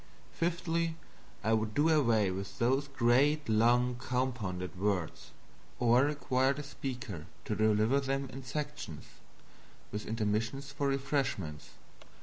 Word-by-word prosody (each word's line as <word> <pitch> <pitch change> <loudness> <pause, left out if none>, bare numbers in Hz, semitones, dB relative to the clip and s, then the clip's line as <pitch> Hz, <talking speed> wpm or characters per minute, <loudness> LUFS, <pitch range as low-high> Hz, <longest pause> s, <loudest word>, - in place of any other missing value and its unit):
Fifthly, 165 -1 0 0.5
I 110 +2 +2
would 110 -1 0
do 150 +3 +4
away 115 -11 +3
with 95 +2 -5
those 135 +4 +2
great 135 +4 +3
long 120 +3 +3
compounded 120 -9 -2
words; 95 -3 -2 0.5
or 120 +2 +4
require 135 -2 +1
the 145 +2 -6
speaker 125 - -6 0.2
to 105 - -1
deliver 110 +5 +3
them 135 0 -1
in 135 +1 -7
sections, 150 - -5 0.9
with 105 +1 -5
intermissions 115 +5 -1
for 140 0 -1
refreshments. 135 - -1
125 Hz, 120 wpm, -32 LUFS, 110-140 Hz, 0.9 s, do